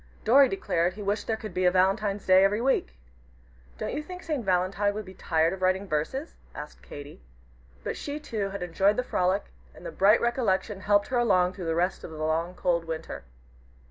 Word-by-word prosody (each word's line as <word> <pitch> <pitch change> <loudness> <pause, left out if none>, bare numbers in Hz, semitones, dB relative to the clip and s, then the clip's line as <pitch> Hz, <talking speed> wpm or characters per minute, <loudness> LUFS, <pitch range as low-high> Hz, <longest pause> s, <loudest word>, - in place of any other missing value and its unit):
Dorry 270 +4 +6
declared 180 - 0
he 210 - -7
wished 205 +2 -1
there 225 - 0
could 215 -1 -8
be 185 0 0
a - - +7
Valentine's 195 +2 +1
Day 185 0 +6
every 205 +2 +2
week. 260 - 0 0.8
"Don't - - -4
you 295 - -2
think 360 +4 -9
St. 300 -6 -2
Valentine 190 +2 +1
would 215 -1 -5
be 185 - -11
tired 165 -1 +1
of 190 - -8
writing 185 +2 +1
verses?" 190 - -2 0.2
asked 150 0 -9
Katy. 145 - -10 0.6
But - - -3
she, 290 +1 -5
too, 215 -9 -3
had 195 -2 -5
enjoyed 195 +4 +2
the 250 - +1
frolic, 185 -3 0 0.2
and - - -13
the - - -5
bright 210 - +5
recollection 225 -4 0
helped 205 +1 +2
her 250 - +1
along 185 -6 +3
through 185 -2 -7
the 165 - 0
rest 180 +3 0
of - - -7
the 160 - -9
long, 160 +3 -1
cold 170 -2 0
winter. 160 - -6
195 Hz, 205 wpm, -27 LUFS, 180-220 Hz, 0.8 s, a